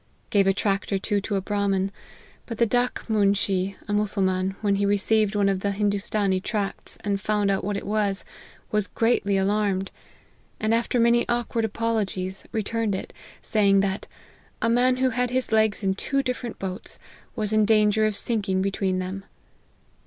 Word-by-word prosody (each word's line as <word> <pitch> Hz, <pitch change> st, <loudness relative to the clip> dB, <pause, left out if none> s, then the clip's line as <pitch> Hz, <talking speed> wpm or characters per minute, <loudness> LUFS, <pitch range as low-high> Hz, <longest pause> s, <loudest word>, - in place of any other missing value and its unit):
Gave 200 Hz, -2 st, +4 dB
a 195 Hz, -, +4 dB
tract 195 Hz, 0 st, -1 dB
or 195 Hz, -, +2 dB
two 205 Hz, +1 st, -1 dB
to 205 Hz, +1 st, -2 dB
a 195 Hz, -, 0 dB
Brahmin; 195 Hz, -1 st, 0 dB, 0.6 s
but 230 Hz, -, -5 dB
the 235 Hz, -, +4 dB
Dak 245 Hz, +2 st, 0 dB
moonshee, 200 Hz, -3 st, +1 dB
a 205 Hz, -, -2 dB
Mussulman, 195 Hz, -2 st, 0 dB
when 200 Hz, -2 st, +2 dB
he 200 Hz, -, +1 dB
receiv 210 Hz, +2 st, +3 dB
ed 205 Hz, -, -7 dB
one 200 Hz, -1 st, +3 dB
of 195 Hz, -1 st, +1 dB
the 200 Hz, -, -1 dB
Hindoostanee 200 Hz, -1 st, 0 dB
tracts, 205 Hz, -1 st, -3 dB
and 200 Hz, -1 st, -1 dB
found 210 Hz, -1 st, +1 dB
what 205 Hz, +1 st, -2 dB
it -, -, -6 dB
was, 205 Hz, -1 st, 0 dB, 0.5 s
was 210 Hz, -1 st, +1 dB
greatly 225 Hz, -4 st, +1 dB
alarmed: 195 Hz, -1 st, 0 dB, 0.7 s
and 215 Hz, +1 st, +1 dB
after 235 Hz, +1 st, +1 dB
many 235 Hz, +1 st, +3 dB
awk 240 Hz, -1 st, -1 dB
ward 230 Hz, -2 st, +1 dB
apologies, 205 Hz, -4 st, -2 dB
returned 220 Hz, -1 st, -1 dB
it, -, -, -6 dB, 0.3 s
saying 200 Hz, -2 st, +3 dB
that 195 Hz, 0 st, -2 dB, 0.3 s
< -, -, -30 dB, 0.2 s
a 230 Hz, -, +3 dB
man 250 Hz, +2 st, +3 dB
who 260 Hz, 0 st, +2 dB
had 250 Hz, +1 st, 0 dB
his 255 Hz, -1 st, -1 dB
legs 220 Hz, -1 st, +2 dB
in 190 Hz, -1 st, +2 dB
two 275 Hz, +7 st, -1 dB
different 250 Hz, -2 st, -4 dB
boats, 190 Hz, 0 st, -4 dB, 0.4 s
was 215 Hz, -2 st, -1 dB
in 215 Hz, 0 st, +4 dB
danger 215 Hz, 0 st, +4 dB
of 215 Hz, -, -2 dB
sinking 200 Hz, -4 st, 0 dB
between 195 Hz, -1 st, 0 dB
them.' 185 Hz, +1 st, -4 dB
205 Hz, 175 wpm, -25 LUFS, 195-220 Hz, 0.7 s, Gave